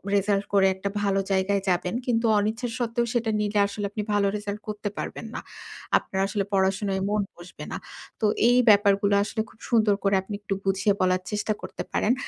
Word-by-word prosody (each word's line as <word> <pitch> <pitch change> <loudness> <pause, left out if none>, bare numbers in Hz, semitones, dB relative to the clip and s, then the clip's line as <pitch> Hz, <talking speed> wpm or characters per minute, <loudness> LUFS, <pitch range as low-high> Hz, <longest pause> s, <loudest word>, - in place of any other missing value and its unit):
Result 200 0 +1
করে 195 -1 +5
একটা 190 +1 -3
ভালো 200 -1 +1
জায়গায় 195 +1 +2
যাবেন। 180 0 0
কিন্তু 230 -1 +1
অনিচ্ছা 220 +4 -1
সত্ত্বেও 235 0 0
সেটা 235 -2 0
নিলে 210 0 0
আসলে 205 0 -4
আপনি 210 0 -3
ভালো 205 -1 +3
রেজাল্ট 205 0 -5
করতে 210 0 -3
পারবেন - - -5
না। - - -2 0.6
আপনার 190 - -3
আসলে 200 -2 -1
পড়াশোনায় 190 0 +2 0.3
মন 210 0 +1 0.2
বসবে 175 +1 -10
না। - - -3 0.4
তো - - +2 0.2
এই 245 - +5
ব্যাপারগুলো 200 -1 +4
আসলে 220 +1 -2
খুব - - -21
সুন্দর 215 -4 +4
করে 195 0 +3
আপনি 190 +2 -8
একটু 205 -1 -2
বুঝিয়ে 195 +1 +2
বলার 185 0 +2
চেষ্টা 210 +1 0
করতে - - -6
পারেন। 225 - +2
205 Hz, 185 wpm, -25 LUFS, 195-215 Hz, 0.6 s, করে